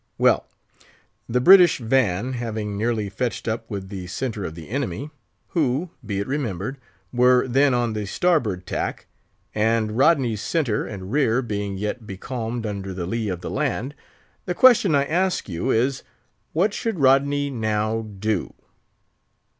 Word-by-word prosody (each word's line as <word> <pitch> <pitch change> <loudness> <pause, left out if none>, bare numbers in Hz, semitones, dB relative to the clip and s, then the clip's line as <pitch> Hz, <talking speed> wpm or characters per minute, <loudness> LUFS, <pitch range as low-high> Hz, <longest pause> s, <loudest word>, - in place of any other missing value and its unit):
Well, - - +3 0.8
the 125 +2 +2
British 180 +5 +7
van 120 -2 +1
having 110 -4 -3
nearly 110 0 -1
fetched 120 +5 -3
up 110 0 -3
with 100 -3 -5
the 95 -3 -6
centre 110 +2 -3
of 80 - -6
the 80 -2 -10
enemy—who, 140 - -3
be 100 -3 -3
it 100 - -2
remembered, 130 - -3 0.3
were 125 +1 +4
then 135 +1 +3
on 120 -2 0
the 105 -2 -3
starboard 110 - +1
tack—and 110 0 -3
Rodney's 130 -6 +3
centre 135 -10 0
and 95 -2 -7
rear 130 -3 +2
being 100 -3 -3
yet 105 +3 -4
becalmed 115 +3 -4
under 100 -3 -4
the 90 -2 -3
lee 110 +3 -2
of 90 -2 -4
the - - -5
land—the 145 +5 -5
question 220 - +6
I 140 0 +3
ask 180 +5 0
you 85 -3 -3
is, 130 +4 +1 0.5
What 195 +6 +1
should 225 -4 -2
Rodney 140 +1 +3
now 110 -2 -1
do?" 105 -2 -3
115 Hz, 140 wpm, -23 LUFS, 105-140 Hz, 0.8 s, British